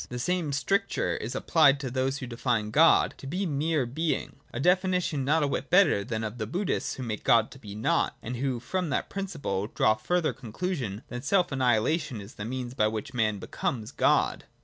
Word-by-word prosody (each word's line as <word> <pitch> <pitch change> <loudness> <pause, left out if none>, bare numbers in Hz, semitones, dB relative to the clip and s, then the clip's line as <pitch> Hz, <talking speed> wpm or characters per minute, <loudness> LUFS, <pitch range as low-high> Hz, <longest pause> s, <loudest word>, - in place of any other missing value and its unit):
The 125 - -5
same 170 +5 -1
stric 195 +8 +1
ture - - -1
is 120 +4 -5
applicable 145 0 +4
to 130 -3 -4
those 130 +1 0
who 135 - -5
define 115 -3 -1
God 160 +7 +5
to 135 - -8
be 185 +7 -2
mere 150 -2 0
Being; 155 +7 -2
a 120 - -5
definition 180 -2 +2
not 150 +3 +2
a - - +2
whit 140 - -3
better 175 - +5
than 110 0 -3
that 110 - -1
of 110 +3 -9
the 110 - -2
Bud 180 - -2
dhists, - - -1
who 130 - -6
make 110 -3 -4
God 115 -1 +4
to 135 - -12
be 105 -4 -9
Nought, 110 - +1
and 120 +2 -4
who 130 -1 -1
from 180 +8 -2
that - - -2
principle 150 - -3
draw 110 -1 +3
the 110 0 -13
further 175 +1 +1
conclusion 120 - -4
that 120 0 -6
self 180 +2 +2
annihilation 130 +1 +1
is 100 +2 -10
the 105 - -6
means 125 0 -4
by 110 -4 +2
which 110 +6 -4
man 110 -4 +1
becomes 110 +3 -3
God. - - +2
130 Hz, 215 wpm, -28 LUFS, 115-160 Hz, -, God